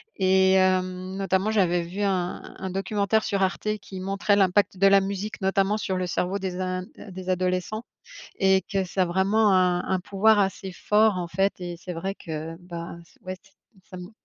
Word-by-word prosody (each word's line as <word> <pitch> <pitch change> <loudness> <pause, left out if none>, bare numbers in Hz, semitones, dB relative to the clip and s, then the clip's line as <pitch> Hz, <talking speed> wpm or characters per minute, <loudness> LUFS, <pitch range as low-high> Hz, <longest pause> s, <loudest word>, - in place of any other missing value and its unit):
et 190 0 +4
hem, 185 0 +1
notamment 195 +1 0
j'avais 180 -5 +2
vu 180 +4 -6
un 185 -3 -1 0.2
un 190 - -5
documentaire 200 +3 0
sur 200 -1 0
Arte 190 +2 -2
qui 190 -2 -9
montrait 195 +2 +1
l'impact 195 0 +2
de 195 +2 +5
la 195 0 +6
musique 200 +2 -4
notamment 195 +2 +1
sur 190 -3 -2
le 185 0 -2
cerveau 180 +3 -1
des 185 -1 -4
in 185 0 -2 0.3
des 185 0 -7
adolescents 185 +4 -1 0.6
et 190 -1 +4
que 195 -2 +1
ça 185 +1 0
a - - 0
vraiment 195 +4 +2
un 180 -1 +3
un 190 - +1
pouvoir 205 +3 +3
assez 195 -1 -1
fort 210 +2 +2
en 175 -1 -3
fait 195 +3 +1
et 175 -1 -6
c'est 180 +2 -7
vrai 190 +4 -3
que 160 -2 -6
bah 170 -2 -7
ç - - -25
ouais 185 0 -4
ç 190 - -25 0.4
ça 185 - -9
m 180 0 -8
190 Hz, 195 wpm, -25 LUFS, 180-195 Hz, 0.6 s, la